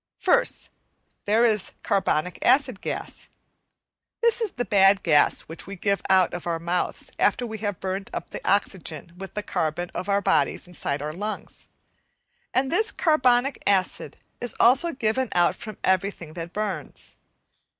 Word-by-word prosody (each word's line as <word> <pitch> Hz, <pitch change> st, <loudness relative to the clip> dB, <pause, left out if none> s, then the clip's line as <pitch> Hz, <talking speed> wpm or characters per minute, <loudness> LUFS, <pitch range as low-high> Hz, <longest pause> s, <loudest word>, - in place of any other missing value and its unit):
First, -, -, +1 dB, 0.5 s
there 220 Hz, +3 st, +4 dB
is 215 Hz, -4 st, +1 dB
carbonic 180 Hz, -3 st, 0 dB
acid 255 Hz, -4 st, +3 dB
gas. -, -, -5 dB, 0.9 s
This 470 Hz, 0 st, +4 dB
is 440 Hz, -4 st, -1 dB
the 245 Hz, -, -3 dB
bad 195 Hz, -1 st, +4 dB
gas 150 Hz, -4 st, +3 dB
which 165 Hz, +3 st, -8 dB
we 200 Hz, -, -6 dB
give 200 Hz, +2 st, 0 dB
out 185 Hz, -2 st, +4 dB
of 175 Hz, 0 st, -5 dB
our 170 Hz, -1 st, 0 dB
mouths 170 Hz, +2 st, -2 dB
after 245 Hz, -, +2 dB
we 220 Hz, -2 st, -6 dB
have 205 Hz, -4 st, -3 dB
burnt 190 Hz, +1 st, -4 dB
up -, -, -6 dB
the -, -, -6 dB
oxygen 175 Hz, -5 st, -1 dB
with 190 Hz, +1 st, -9 dB
the 210 Hz, -, -2 dB
carbon 175 Hz, -1 st, -2 dB
of 185 Hz, -, -4 dB
our 200 Hz, 0 st, +3 dB
bodies 200 Hz, -, +1 dB
inside 145 Hz, -5 st, -3 dB
our 150 Hz, +1 st, -4 dB
lungs; 210 Hz, +5 st, -5 dB, 0.8 s
and 265 Hz, +1 st, +1 dB
this 435 Hz, +6 st, +2 dB
carbonic 270 Hz, -4 st, +2 dB
acid 190 Hz, -2 st, 0 dB, 0.2 s
is 245 Hz, -2 st, -1 dB
also 270 Hz, +8 st, +5 dB
given 255 Hz, -1 st, 0 dB
out 175 Hz, -1 st, +3 dB
from 215 Hz, -3 st, -9 dB
everything 185 Hz, -4 st, 0 dB
that 170 Hz, 0 st, -6 dB
burns. 210 Hz, 0 st, -5 dB
200 Hz, 155 wpm, -25 LUFS, 175-235 Hz, 0.9 s, also